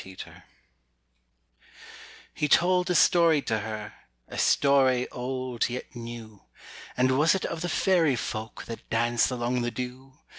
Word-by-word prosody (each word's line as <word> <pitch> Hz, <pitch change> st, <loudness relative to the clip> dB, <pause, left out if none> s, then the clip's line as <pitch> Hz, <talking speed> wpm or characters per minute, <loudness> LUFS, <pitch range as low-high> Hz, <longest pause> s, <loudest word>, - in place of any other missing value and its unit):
UNDER 95 Hz, 0 st, -12 dB
THE -, -, -9 dB
ROSE -, -, -16 dB, 1.9 s
He 150 Hz, -, -1 dB
told 180 Hz, +3 st, +3 dB
a 180 Hz, -, +1 dB
story 165 Hz, -3 st, +5 dB
to 110 Hz, -1 st, -1 dB
her, 105 Hz, 0 st, -6 dB, 0.4 s
A -, -, -6 dB
story 130 Hz, -3 st, +3 dB
old 125 Hz, -1 st, -3 dB
yet 125 Hz, +1 st, -7 dB
new 115 Hz, -3 st, -9 dB, 0.6 s
And 130 Hz, +1 st, +2 dB
was 160 Hz, +5 st, +4 dB
it 190 Hz, -, -2 dB
of 165 Hz, -, -4 dB
the 175 Hz, -, -2 dB
Faëry 170 Hz, -7 st, +2 dB
Folk 110 Hz, -1 st, -5 dB
That 115 Hz, -, -9 dB
dance 120 Hz, +1 st, +1 dB
along 125 Hz, 0 st, -1 dB
the 120 Hz, -, -1 dB
dew? 125 Hz, +2 st, -7 dB
125 Hz, 150 wpm, -27 LUFS, 120-150 Hz, 1.9 s, story